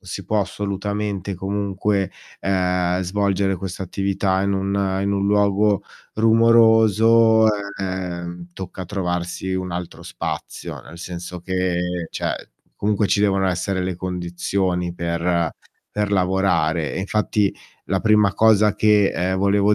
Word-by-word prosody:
si 95 Hz, 0 st, -7 dB
può 105 Hz, +4 st, 0 dB
assolutamente, 100 Hz, 0 st, -3 dB
comunque, 100 Hz, +1 st, -1 dB, 0.3 s
uhm, 90 Hz, -1 st, +1 dB
svolgere 95 Hz, +1 st, 0 dB
questa 95 Hz, +1 st, -5 dB
attività 95 Hz, 0 st, 0 dB
in 100 Hz, 0 st, +1 dB
un 95 Hz, 0 st, 0 dB
in 100 Hz, -, 0 dB
un 100 Hz, 0 st, 0 dB
luogo 100 Hz, 0 st, +2 dB, 0.3 s
rumoroso, 115 Hz, 0 st, +5 dB, 0.4 s
uhm, 90 Hz, -2 st, -4 dB
tocca 95 Hz, 0 st, -7 dB
trovarsi 90 Hz, 0 st, -3 dB
un 95 Hz, -1 st, -3 dB
altro 90 Hz, 0 st, -6 dB
spazio. -, -, -5 dB
Nel 70 Hz, +7 st, -13 dB
senso 90 Hz, +1 st, -7 dB
che 90 Hz, -1 st, -1 dB
cioè, -, -, -4 dB, 0.3 s
comunque 105 Hz, 0 st, +1 dB
ci 100 Hz, -, +2 dB
devono 95 Hz, -2 st, +2 dB
essere 95 Hz, +1 st, -1 dB
le 90 Hz, 0 st, -2 dB
condizioni 90 Hz, 0 st, -2 dB
per 85 Hz, -1 st, 0 dB, 0.4 s
per 105 Hz, -1 st, -1 dB
lavorare. 90 Hz, -4 st, +1 dB
Infatti 105 Hz, +1 st, 0 dB, 0.3 s
la 95 Hz, -, -1 dB
prima 105 Hz, -2 st, +4 dB
cosa 105 Hz, 0 st, +4 dB
che, 105 Hz, -2 st, +4 dB
ehm, 95 Hz, +2 st, -1 dB
volevo 100 Hz, +2 st, +3 dB
95 Hz, 120 wpm, -21 LUFS, 90-100 Hz, 0.4 s, rumoroso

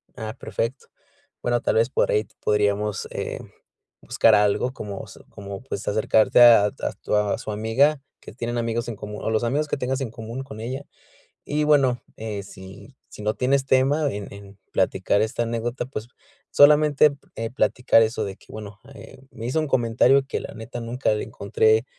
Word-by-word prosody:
Ah, 110 Hz, 0 st, -6 dB
perfecto. 120 Hz, +4 st, -4 dB, 0.5 s
Bueno, 120 Hz, -1 st, 0 dB
tal -, -, 0 dB
vez 115 Hz, +2 st, +3 dB
por -, -, +1 dB
ahí 105 Hz, 0 st, +1 dB, 0.2 s
podríamos, 105 Hz, 0 st, 0 dB
eh, -, -, -4 dB, 0.6 s
buscar 110 Hz, -, +4 dB
algo 105 Hz, +4 st, +2 dB
como 105 Hz, -5 st, -7 dB
s -, -, -14 dB
como, 100 Hz, -1 st, -8 dB
pues, 105 Hz, -6 st, -6 dB
acercarte 110 Hz, +2 st, +3 dB
a 115 Hz, -4 st, +8 dB
a -, -, -4 dB, 0.3 s
tu -, -, -1 dB
a 105 Hz, -1 st, +1 dB
su -, -, -6 dB
amiga, 115 Hz, +8 st, +2 dB, 0.2 s
que -, -, -12 dB
tienen 120 Hz, +1 st, -4 dB
amigos 115 Hz, 0 st, -2 dB
en 120 Hz, -, -4 dB
común, 105 Hz, +1 st, -8 dB
o -, -, -1 dB
los 110 Hz, +1 st, 0 dB
amigos 145 Hz, +6 st, 0 dB
que -, -, -2 dB
tengas 130 Hz, +1 st, -2 dB
en 125 Hz, -5 st, -3 dB
común 115 Hz, +3 st, -7 dB
con 110 Hz, -5 st, -10 dB
ella. 130 Hz, +5 st, -5 dB, 0.6 s
Y 150 Hz, +1 st, -1 dB
bueno, 140 Hz, -5 st, +3 dB
eh, 110 Hz, -2 st, -5 dB
si 95 Hz, +7 st, -13 dB
si -, -, -11 dB
no 105 Hz, +1 st, 0 dB
tienes 135 Hz, +1 st, +1 dB
tema 135 Hz, +3 st, +2 dB
en 100 Hz, -1 st, -7 dB
en 100 Hz, 0 st, -13 dB
platicar 100 Hz, -, +1 dB
esta 110 Hz, +2 st, -1 dB
anécdota, 120 Hz, +1 st, -3 dB
pues, 120 Hz, -3 st, -7 dB, 0.4 s
solamente 150 Hz, 0 st, +6 dB
p 140 Hz, -, -18 dB
eh, 115 Hz, 0 st, -3 dB
platicar 125 Hz, -2 st, +3 dB
eso 110 Hz, 0 st, -1 dB
de 95 Hz, -1 st, -6 dB
que: -, -, -23 dB
"Bueno, 105 Hz, -1 st, -9 dB
eh, 135 Hz, -, -13 dB
me 115 Hz, +1 st, -7 dB
hizo 130 Hz, +6 st, 0 dB
un 155 Hz, -, -2 dB
comentario 125 Hz, +2 st, +3 dB
que -, -, -3 dB
la -, -, -8 dB
neta 115 Hz, +2 st, -7 dB
nunca 120 Hz, +3 st, -1 dB
le 105 Hz, -, -3 dB
encontré, 110 Hz, +3 st, +1 dB
115 Hz, 190 wpm, -23 LUFS, 105-130 Hz, 0.6 s, a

